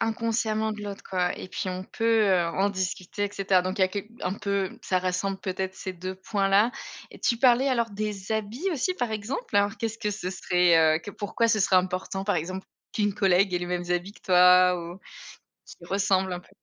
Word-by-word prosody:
inconsciemment 225 -1 0
de 210 -1 -8
l'autre 200 -1 -7
quoi, 180 -1 0
et - - -8
puis - - -4
on 185 0 -4
peut, 225 +3 +1
heu, 180 -3 +3
en 190 +4 0
discuter 190 +1 -3
et 205 - -1
cetera, 195 -2 +2
donc 185 +3 -3
il - - +3
y - - +8
a - - 0
quelque 205 +3 -6
un 180 - -1
peu 200 -1 -2
ça 185 - +1
rassemble 185 +2 -1
peut-être 190 0 -3
ces 190 0 -6
2 185 +1 -6
points 195 +1 -1
là, 205 +4 +4 0.4
et - - -13
tu 235 - +1
parlais 255 +2 +4
alors 235 -3 0
des 205 -1 -5
habits 220 - -2
aussi 335 +5 0
par 245 -11 -2
exemple. 220 - -3
Alors 205 +1 +2
qu'est-ce 225 -1 -3
que 210 -2 -1
ce 200 -3 -4
serait, 170 -4 +3
heu - - -2
que 205 - -8
pourquoi 210 +3 -1
ce 220 - +3
serait 190 -1 +4
important 185 +1 -1
par 205 -2 +1
exemple 185 +4 -4 0.3
qu'une 205 -1 +1
collègue 195 -1 +3
ait 180 - +1
les 175 - -4
mêmes 175 0 -3
habits 180 +3 -1
que - - -21
toi 180 0 +6
ou 170 +2 -8 0.7
qu'ils 170 - -13
ressemblent 190 -1 +1
un 175 - -4
peu? - - -23
195 Hz, 225 wpm, -26 LUFS, 185-215 Hz, 0.7 s, y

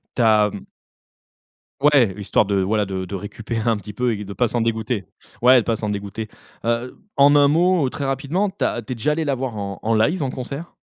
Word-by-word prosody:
Tu 125 - 0
as 105 -2 +4 1.3
Ouais 135 -10 +4
histoire 100 +1 +1
de 100 -1 +1
voilà 105 +2 +1
de 95 -1 -4
de 95 +2 -6
récupérer 110 +3 -3
un 115 - +3
petit 105 0 -8
peu 120 +3 0
et 105 - -6
de 100 - -8
pas 120 +4 +1
s'en 120 +1 -1
dégoûter 110 -2 -1 0.4
ouais 125 +2 +7
de - - -3
pas 115 - +1
s'en 105 -1 -3
dégoûter. 100 +2 -5 0.3
Heu, 120 +2 -2 0.2
en 140 +1 +6
un 145 -1 +6
mot 170 -2 +3
très 140 +2 -4
rapidement, 140 +9 -1
tu 165 - -5
as 120 -1 0
tu 120 +4 -5
es - - -7
déjà 135 +6 0
allé 160 +1 -1
la 140 -2 0
voir 125 -3 -4
en 100 -1 -5
en 115 +1 +1
live, 130 +10 +2
en 135 - -1
concert? 140 +6 -7
115 Hz, 225 wpm, -21 LUFS, 105-140 Hz, 1.3 s, ouais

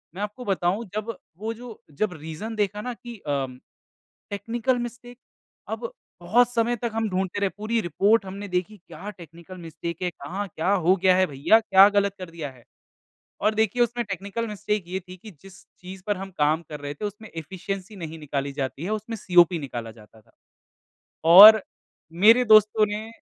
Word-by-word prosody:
मैं 200 - -6
आपको 210 +4 -5
बताऊँ 195 +3 0
जब 215 0 -3 0.2
वो 220 +3 -4
जो 235 -1 -11 0.2
जब 210 -4 +1
रीज़न 160 +8 -7
देखा 210 0 -1
ना 250 +1 -4
कि 235 -1 -11
अ, 140 -4 -2 0.9
टेक्निकल 230 +5 -1
मिस्टेक 245 +1 -14 0.5
अब 480 +1 -4 0.3
बहुत 235 +7 +3
समय 235 0 +1
तक 235 0 -4
हम 225 -1 0
ढूँढते 190 +1 -2
रहे 200 -1 +1
पूरी 225 +2 -1
रिपोर्ट 195 +5 +2
हमने 200 +2 -7
देखी 185 +3 -3
क्या 180 +3 -10
टेक्निकल 170 +2 -12
मिस्टेक 170 +1 -7
है, 180 - 0
कहाँ 185 +6 -6
क्या 170 +3 -2
हो 185 +2 +5
गया 185 -1 +5
है 185 0 +4
भैया, 145 +11 +3
क्या 200 -3 +6
गलत 200 -1 +1
कर 180 -2 -7
दिया 160 -4 -6
है। 125 -2 -19 0.8
और 215 - +2
देखिए 220 +2 +1
उसमें 240 0 -2
टेक्निकल 200 +3 -4
मिस्टेक 210 -1 -2
ये 190 +1 -3
थी 185 - -9
कि 215 +3 -12
जिस 195 -1 -15 0.2
चीज़ 185 +1 -10
पर 205 -2 0
हम 195 0 -7
काम 155 +2 +2
कर 150 -1 -7
रहे 145 0 -5
थे 210 - -6
उसमें 210 +2 -7
एफ़िशिएंसी 190 +5 -6
नहीं 165 -3 -7
निकाली 140 -2 -3
जाती 135 +4 -4
है 190 - -3
उसमें 215 +2 -4
सीओपी 175 -2 +4
निकाला 120 -5 -6
जाता 110 0 -18
था। 110 - -29 1.0
और 215 +3 +11 0.6
मेरे 245 +3 +7
दोस्तों 215 0 +6
ने 215 +2 -5
195 Hz, 185 wpm, -24 LUFS, 170-220 Hz, 1.0 s, और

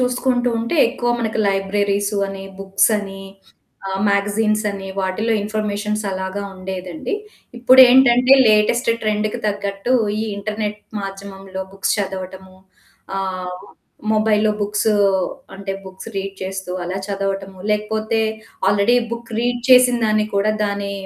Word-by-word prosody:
చూసుకుంటూ 250 0 +1
ఉంటే 235 +8 -2
ఎక్కువ 240 -1 -2
మనకు 220 -1 -2
లైబ్రరీసు 200 +1 0
అని 195 0 -7 0.2
బుక్స్ 195 +2 +2
అని 195 -1 -7 0.7
ఆహ్, 190 0 -2
మ్యాగజైన్స్ 210 +2 +1
అని 195 -1 -7
వాటిలో 195 +4 -1
ఇన్ఫర్మేషన్స్ 210 0 -2
అలాగా 190 +2 -4
ఉండేదండి. 185 - -5 0.4
ఇప్పుడేంటంటే 255 0 +7
లేటెస్ట్ 215 +3 +3
ట్రెండ్‌కి 215 0 -1
తగ్గట్టు 200 +3 -2 0.3
ఈ - - 0
ఇంటర్నెట్ 210 +1 -3 0.2
మాధ్యమంలో 195 -1 -7
బుక్స్ 195 0 0
చదవటము 190 -1 -5 0.6
ఆహ్, 185 -1 -3 0.6
మొబైల్‌లో 215 0 +3
బుక్స్ 210 +2 0 0.7
అంటే 195 0 -5
బుక్స్ 190 +3 -10
రీడ్ 195 0 -3
చేస్తూ 190 -1 -5
అలా 180 +2 -4
చదవటము 195 -1 -3
లేకపోతే 220 +1 0 0.5
ఆల్రెడీ 205 +4 +3
బుక్ 235 0 -6
రీడ్ 245 +1 0
చేసిన 250 -1 +7
దాన్ని 215 0 +2
కూడా 200 +2 +2
దాని 200 -1 -2
205 Hz, 115 wpm, -20 LUFS, 195-220 Hz, 0.7 s, ఇప్పుడేంటంటే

